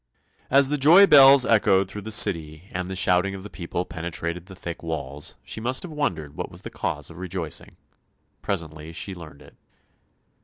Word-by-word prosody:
As 135 0 +4
the 150 0 0
joy 170 +9 +8
bells 135 -5 +8
echoed 100 -4 +3
through 105 +2 -8
the 110 - -8
City 85 -5 +1
and 90 0 -4
the 95 - -5
shouting 90 +1 +1
of 95 - -9
the 105 - -10
people 85 0 -4
penetrated 85 +1 -5
the 95 - -11
thick 85 -2 -7
walls 75 -3 -4
she 110 - -7
must 125 +3 -1
have 180 - -8
wondered 85 - -3
what - - -5
was - - -14
the - - -8
cause - - -4
of 80 - -13
rejoicing. 90 -3 -5 0.6
Presently 80 -4 -4
she 95 +4 -4
learnt 80 -5 -12
it. - - -18
90 Hz, 185 wpm, -24 LUFS, 80-110 Hz, 0.6 s, joy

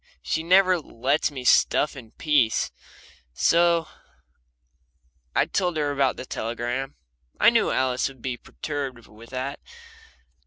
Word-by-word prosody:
She 160 - -1
never 185 +1 +4
lets 130 +1 0
me 135 -4 -7
stuff 145 +4 +3
in 120 -5 -11
peace. 145 -8 +1 0.6
So 170 - +3 1.5
I - - +4
told 180 -3 -1
her 145 -1 0
about 135 -2 +1
the 130 - -6
telegram 120 +4 -4 0.4
I - - +7
knew - - +2
Alice 130 -1 +1
would 135 -2 -11
be 130 -2 -2
perturbed 135 -2 -6
with 110 +2 -15
that. 130 +2 -4
135 Hz, 125 wpm, -25 LUFS, 125-155 Hz, 1.5 s, I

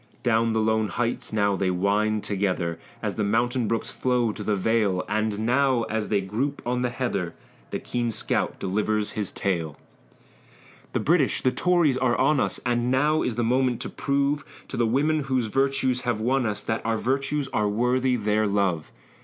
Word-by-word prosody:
Down 115 -1 +2
the 110 - +1
lone 110 0 +2
heights 120 +2 -2
now 100 -2 +2
wind 100 +3 +1
they - - -6
together, 95 -4 -1 0.2
As - - -1
the 105 - +1
mountain 120 +3 +1
brooks 115 +1 -1
flow 125 -3 +1
to 105 - -7
the 105 0 +1
vale, 100 -2 +1
And 110 0 0
now, 130 0 +3
as 110 -1 -1
they 105 -2 +2
group 120 +9 -2
on 125 +1 0
the 125 - +1
heather, 120 -9 -2 0.3
The - - -2
keen 120 -1 -2
scout 110 -2 -1
delivers 105 +2 0
his 105 -3 -2
tale: 85 -6 -2 1.2
"The - - +1
British 155 -4 +2
the 130 - +3
Tories 170 -6 +2
are 130 -2 +2
on 140 +2 +3
us, - - 0
And 120 0 +1
now 150 +4 +2
is 120 - -1
the 120 - 0
moment 125 0 +1
to - - -4
prove 140 +1 0 0.3
To - - -5
the 120 -1 +2
women 145 +5 +1
whose 130 -3 0
virtues 130 +1 +1
have 120 -4 -1
won 125 +2 +1
us, 105 -1 -3
That 110 - -2
our 115 0 0
virtues 135 +4 -1
are 105 -1 0
worthy 125 +4 +1
their 105 -1 +1
love! 100 -6 0
115 Hz, 185 wpm, -25 LUFS, 105-130 Hz, 1.2 s, now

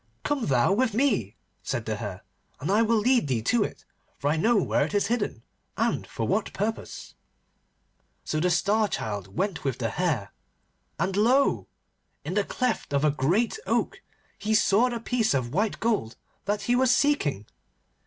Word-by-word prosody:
'Come 290 -4 -1
thou 130 +6 +3
with 225 0 +1
me,' 275 +4 +1 0.3
said - - -3
the - - -2
Hare, - - -6 0.4
'and - - -2
I 210 +3 +4
will 230 0 +3
lead 240 - +3
thee 120 -5 -1
to 230 - +2
it, - - -7 0.3
for 145 - 0
I - - +1
know 225 +8 +3
where 185 - +2
it 165 +8 -3
is 205 - +2
hidden, 205 - -3 0.3
and - - 0
for 110 - -3
what 205 +1 0
purpose.' 220 +3 -4 1.1
So 155 - -1
the 180 +3 +2
Star 205 +5 +2
Child 100 - -5
went 195 -4 -1
with 135 -3 -1
the 115 -2 -1
Hare, 150 - -1 0.7
and 185 +3 -1
lo! 250 +7 +3 0.6
in 170 - -3
the 205 +1 +2
cleft 245 - -2
of 140 +2 +2
a 150 - +4
great 175 - +1
oak - - +1
tree - - -18 0.4
he 215 +1 0
saw 215 +3 +4
the 240 -1 -3
piece 230 - 0
of 125 -1 -2
white 210 +4 0
gold 210 - 0 0.3
that 205 +1 -1
he 245 - +2
was 260 0 +3
seeking. 245 - +2
205 Hz, 180 wpm, -26 LUFS, 145-230 Hz, 1.1 s, I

